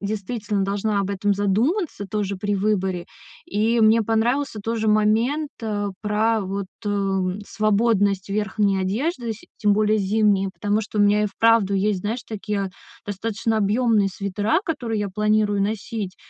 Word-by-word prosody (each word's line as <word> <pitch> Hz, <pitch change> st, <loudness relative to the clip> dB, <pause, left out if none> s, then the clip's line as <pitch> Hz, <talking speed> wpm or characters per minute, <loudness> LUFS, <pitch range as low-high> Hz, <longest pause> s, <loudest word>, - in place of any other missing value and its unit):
действительно 205 Hz, 0 st, -2 dB
должна 200 Hz, +1 st, -1 dB
об 200 Hz, 0 st, -1 dB
этом 200 Hz, +1 st, 0 dB
задуматься 215 Hz, -, 0 dB
тоже 200 Hz, -2 st, -2 dB
при 205 Hz, +2 st, -1 dB
выборе. 190 Hz, -3 st, 0 dB, 0.4 s
И 220 Hz, +3 st, +1 dB
мне 220 Hz, +1 st, +5 dB
понравился 225 Hz, +4 st, 0 dB
тоже 225 Hz, -1 st, -1 dB
момент, 225 Hz, +8 st, +2 dB
а, 205 Hz, -2 st, -2 dB
про, 215 Hz, +1 st, +1 dB
вот, 195 Hz, 0 st, -3 dB, 0.2 s
эм, 195 Hz, -2 st, -1 dB
свободность 205 Hz, -3 st, +1 dB
верхней 200 Hz, -1 st, 0 dB
одежды, 235 Hz, -, -1 dB
сь 215 Hz, -, -15 dB
тем 210 Hz, -2 st, +3 dB
более 215 Hz, 0 st, +2 dB
зимней, 200 Hz, -1 st, +2 dB
потому 205 Hz, +2 st, 0 dB
что 215 Hz, 0 st, -5 dB
у -, -, +5 dB
меня 205 Hz, +1 st, +4 dB
и -, -, +1 dB
вправду 210 Hz, -1 st, +3 dB
есть, 195 Hz, 0 st, +1 dB
знаешь, 225 Hz, +5 st, -3 dB
такие 205 Hz, -2 st, -3 dB, 0.3 s
достаточно 220 Hz, +2 st, -2 dB
объёмные 215 Hz, 0 st, +2 dB
свитера, 200 Hz, -, 0 dB
которые 245 Hz, -9 st, -2 dB
я 205 Hz, -, -2 dB
планирую 210 Hz, 0 st, +1 dB
носить. 210 Hz, -2 st, -3 dB
210 Hz, 145 wpm, -23 LUFS, 200-220 Hz, 0.4 s, мне